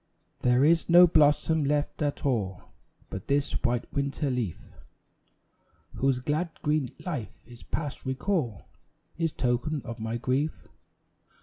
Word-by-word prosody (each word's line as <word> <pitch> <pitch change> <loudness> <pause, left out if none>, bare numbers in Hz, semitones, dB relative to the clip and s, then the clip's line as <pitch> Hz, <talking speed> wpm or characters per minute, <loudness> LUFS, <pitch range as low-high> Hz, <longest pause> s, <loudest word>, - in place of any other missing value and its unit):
There 125 +2 +4
is 165 +2 +3
no 175 +1 +9
blossom 155 -1 +3
left 145 +2 -1
at 145 -1 -1
all; 100 -9 -1 0.5
But 95 - -6
this 140 0 +1
white 120 0 +1
winter 140 0 -1
leaf, 120 -9 -2 1.3
Whose 135 -1 +1
glad 150 +7 -1
green 150 -4 +1 0.2
life 150 - -5
is 120 -1 -14
past 150 -4 -4
recall, 130 - -1 0.6
Is 165 -2 +1
token 130 +5 0
of 115 0 -6
my 110 +1 -2
grief. 130 +6 -2
140 Hz, 125 wpm, -28 LUFS, 125-155 Hz, 1.3 s, no